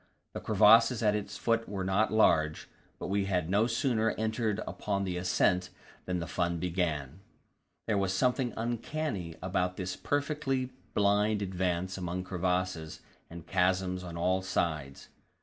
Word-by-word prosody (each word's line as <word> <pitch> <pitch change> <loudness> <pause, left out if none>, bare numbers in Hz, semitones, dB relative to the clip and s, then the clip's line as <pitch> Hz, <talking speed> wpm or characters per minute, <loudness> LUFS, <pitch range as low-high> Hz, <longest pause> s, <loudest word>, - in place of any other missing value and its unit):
The - - -4
crevasses 115 +2 +5
at 105 -1 +4
its 105 -1 -4
foot 115 -1 0
were 100 -2 -3
not 95 +4 +1
large, 80 -8 +3 0.3
but - - -6
we 100 0 0
had 90 -3 -1
no 105 +4 +3
sooner 115 -3 +1
entered 110 -1 -1
upon 100 -1 -2
the 95 -2 -2
ascent 90 0 +1 0.4
than 90 -1 -1
the 85 - -3
fun 85 +2 -1
began. 80 -4 -2 0.7
There 105 -3 +1
was 95 -1 0
something 125 +5 +1
uncanny 115 - -3
about 90 -1 -1
this 90 -1 -3
perfectly 140 -3 -1 0.2
blind 105 +1 +2
advance 95 0 -2
among 90 0 -3
crevasses 90 -3 -2 0.3
and 85 0 -9
chasms 90 0 +1
on 85 -2 -7
all 95 +2 +1
sides. 80 -7 -2
95 Hz, 145 wpm, -30 LUFS, 90-110 Hz, 0.7 s, crevasses